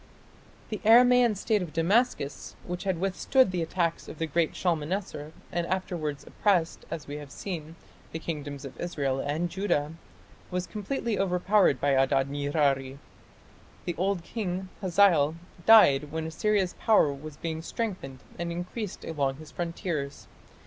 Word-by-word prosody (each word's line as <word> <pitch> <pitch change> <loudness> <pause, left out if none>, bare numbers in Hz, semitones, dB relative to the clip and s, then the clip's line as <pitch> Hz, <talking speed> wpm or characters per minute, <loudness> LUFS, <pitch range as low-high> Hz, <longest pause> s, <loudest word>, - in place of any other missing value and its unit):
The 215 - -3
Aramaean 240 0 +6
state 210 +1 +1
of 170 -5 -6
Damascus, 165 - 0
which 180 +2 -5
had 190 -3 0
withstood 195 +6 +2
the 180 -2 -1
attack 170 0 -1
of - - -9
the 160 - -1
great 160 +1 0
Shalmaneser 165 -2 -2 0.2
and 170 -1 -1
afterwards 170 -6 -3
oppressed, 180 -6 0
as 160 -2 -5
we 145 0 -6
have 145 -1 -9
seen, 165 -2 -6 0.4
the - - -3
kingdoms 145 -4 -5
of 135 - -10
Israel 140 -6 -1
and 150 +5 -1
Judah, 170 -5 -1 0.6
was 180 -1 -2
completely 215 +1 -3
overpowered 185 -4 +3
by 145 - +2
Adad 135 0 +2
nirari. 140 -2 0 0.9
The 175 - -1
old 185 0 0
king, 190 -3 -4
Hazael, 175 -5 +4 0.3
died 150 -10 +7
when 160 0 -3
Assyria's 190 +3 0
power 210 -10 +4
was 145 +1 -9
being 160 -1 -4
strengthened 170 - -5 0.2
and 170 0 -2
increased 180 +4 -5
along 140 -4 -1
his 155 +2 -12
frontiers. 165 -4 -4
170 Hz, 140 wpm, -28 LUFS, 145-190 Hz, 0.9 s, died